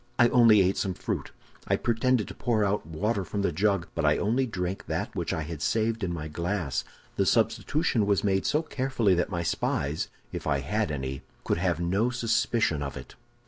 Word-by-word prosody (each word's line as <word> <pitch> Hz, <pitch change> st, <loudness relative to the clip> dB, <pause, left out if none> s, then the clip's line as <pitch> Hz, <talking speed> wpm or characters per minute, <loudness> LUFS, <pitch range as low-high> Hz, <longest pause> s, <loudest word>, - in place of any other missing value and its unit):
I 120 Hz, -1 st, +6 dB
only 115 Hz, -5 st, +6 dB
ate 95 Hz, +1 st, +1 dB
some 95 Hz, -2 st, -1 dB
fruit. -, -, -3 dB, 0.4 s
I -, -, +3 dB
pretended 120 Hz, -1 st, +1 dB
to -, -, -7 dB
pour 110 Hz, -4 st, +1 dB
out 100 Hz, -4 st, -1 dB
water 100 Hz, +6 st, -1 dB
from 100 Hz, +2 st, -3 dB
the 95 Hz, -, +1 dB
jug, 100 Hz, +1 st, +1 dB
but -, -, -2 dB
I -, -, +4 dB
only 125 Hz, +5 st, +1 dB
drank 95 Hz, -3 st, -4 dB
that -, -, -3 dB
which -, -, -2 dB
I 80 Hz, -, -2 dB
had 75 Hz, -1 st, -6 dB
saved 115 Hz, +2 st, 0 dB
in 90 Hz, -, -1 dB
my 80 Hz, -3 st, -4 dB
glass. 85 Hz, -1 st, -2 dB, 0.3 s
The -, -, +3 dB
substitution 140 Hz, -, +1 dB
was 100 Hz, -2 st, +2 dB
made 95 Hz, -2 st, +1 dB
so 150 Hz, +2 st, +2 dB
carefully 130 Hz, -9 st, +1 dB
that 85 Hz, -1 st, +1 dB
my 85 Hz, -3 st, -2 dB
spies, 75 Hz, -2 st, -1 dB, 0.2 s
if -, -, -5 dB
I 70 Hz, -2 st, +1 dB
had 105 Hz, +6 st, -1 dB
any, 65 Hz, -2 st, -4 dB, 0.2 s
could -, -, 0 dB
have 90 Hz, -2 st, 0 dB
no 95 Hz, +7 st, +1 dB
suspicion 115 Hz, -, +1 dB
of 70 Hz, -1 st, -4 dB
it. -, -, -10 dB
100 Hz, 200 wpm, -27 LUFS, 85-115 Hz, 0.4 s, I